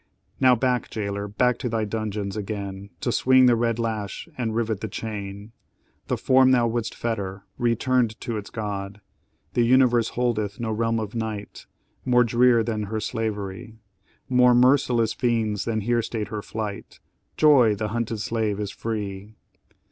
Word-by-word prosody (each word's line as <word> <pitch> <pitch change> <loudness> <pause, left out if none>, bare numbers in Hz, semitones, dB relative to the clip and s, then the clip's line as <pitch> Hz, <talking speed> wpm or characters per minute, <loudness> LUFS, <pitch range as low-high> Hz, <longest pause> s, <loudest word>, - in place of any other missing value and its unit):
"Now 130 -1 +6
back, 125 0 0
jailor, 100 -1 -3
back 125 +4 +1
to 125 - -2
thy 110 -1 -1
dungeons, 105 -2 -3
again, 100 -2 -5
To 120 - 0
swing 130 +2 +5
the 120 -1 +5
red 115 -1 0
lash 110 - -3
and 115 -3 -2
rivet 115 -3 -1
the 110 - -3
chain! 105 -1 -6 0.6
The - - 0
form 130 0 +4
thou 125 -2 +4
would'st 115 -1 -3
fetter 100 -4 -3 0.2
returned 120 -1 +1
to 120 -3 -3
its 105 -2 -5
God; 100 -2 -5 0.5
The 120 - +2
universe 120 -1 +4
holdeth 110 -5 -1
no 115 -2 -2
realm 115 +1 0
of 110 -1 -5
night 110 -3 -5 0.4
More 125 -1 +4
drear 120 0 +4
than 110 -2 -2
her 110 +2 -3
slavery 110 +1 -4 0.5
More 125 -1 +5
merciless 125 -3 +3
fiends 110 -3 0
than 110 -2 -1
here 120 +3 +1
stayed 110 -1 -4
her 105 - -4
flight 105 -1 -6 0.4
Joy! 130 -8 +5
the 105 +1 -3
hunted 115 0 -2
slave 110 -2 -1
is 105 -1 -3
free! 105 -2 -5
110 Hz, 155 wpm, -24 LUFS, 105-120 Hz, 0.6 s, Now